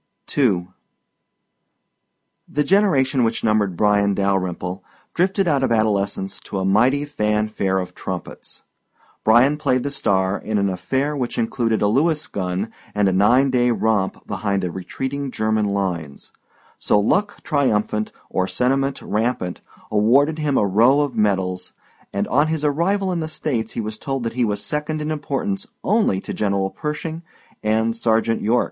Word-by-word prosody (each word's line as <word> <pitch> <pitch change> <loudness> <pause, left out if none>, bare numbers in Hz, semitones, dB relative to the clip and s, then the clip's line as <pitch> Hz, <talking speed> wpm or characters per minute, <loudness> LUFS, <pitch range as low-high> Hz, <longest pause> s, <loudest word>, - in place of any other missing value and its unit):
II 95 -10 +2 1.8
The 150 - 0
generation 145 -9 +3
which 115 0 -1
numbered 105 -5 +1
Bryan 100 -1 +3
Dalyrimple 95 -1 -1 0.3
drifted 190 +2 +1
out 145 -4 +2
of 130 - +1
adolescence 100 -3 0
to 100 - -6
a 95 - -1
mighty 125 +9 +3
fan 105 -5 0
fare 95 -3 0
of 90 -1 -3
trumpets. 90 -1 -7 0.6
Bryan 120 +7 +5
played 130 -4 +1
the 140 - -2
star 95 -6 0
in 110 0 -2
an 100 -1 +1
affair 135 +10 -1
which 125 -4 -3
included 115 -1 0
a - - +4
Lewis 150 +8 +2
gun 95 +3 -3 0.2
and 105 -1 +3
a - - +3
nine 125 +8 +4
day 125 -1 +3
romp 110 -4 0
behind 100 -2 -2
the 90 - -2
retreating 135 +10 -4
German 110 -2 0
lines, 90 -8 -3 0.5
so 105 - +3
luck 200 - 0
triumphant 105 -7 0 0.2
or 95 0 -1
sentiment 135 +4 0
rampant 105 -5 -2 0.3
awarded 135 +9 +3
him 145 -3 +1
a - - +3
row 115 +9 +4
of 140 -4 -2
medals 95 -4 0 0.4
and - - -1
on 145 +4 +3
his 160 -1 -1
arrival 185 +6 +1
in 175 - -1
the 160 - -2
States 125 -8 -3
he - - -2
was 110 0 -5
told 135 -2 -3
that 115 -1 -3
he 125 0 +1
was 105 -1 -2
second 150 +1 -2
in 150 +1 -3
importance 155 +7 -3 0.2
only 210 - +2
to - - -6
General 100 -2 0
Pershing 155 +2 -4 0.4
and 110 +1 +1
Sergeant 115 0 +1
York. 115 +3 +2
115 Hz, 155 wpm, -21 LUFS, 100-140 Hz, 1.8 s, Bryan